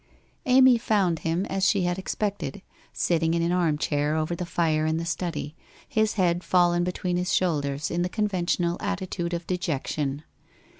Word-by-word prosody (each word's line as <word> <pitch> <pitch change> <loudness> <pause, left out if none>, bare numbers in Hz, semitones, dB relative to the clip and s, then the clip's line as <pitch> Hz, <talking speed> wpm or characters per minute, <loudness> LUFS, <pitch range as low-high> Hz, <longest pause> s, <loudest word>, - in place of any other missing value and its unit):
Amy 255 -1 +6
found 195 -8 +1
him 165 +4 -1
as 195 0 +1
she 200 -3 +2
had 175 +1 -1
expected, 200 0 -3 0.3
sitting 165 -1 +1
in 170 - +1
an 170 - +1
armchair 150 -3 +1
over 160 +2 -1
the 175 0 -5
fire 160 -3 +1
in 160 0 0
the 165 - -3
study, 170 -3 -3 0.3
his 220 -5 +1
head 175 -3 +1
fallen 175 -1 +3
be 180 - -1
tween 180 0 -2
his 180 +1 -1
shoulders 145 -5 0
in 170 - 0
the 180 - 0
conventional 180 -4 0
attitude 185 -3 -3
of 170 -1 -3
de 180 0 -2
jection. 145 -2 -2
175 Hz, 170 wpm, -26 LUFS, 165-190 Hz, 0.3 s, Amy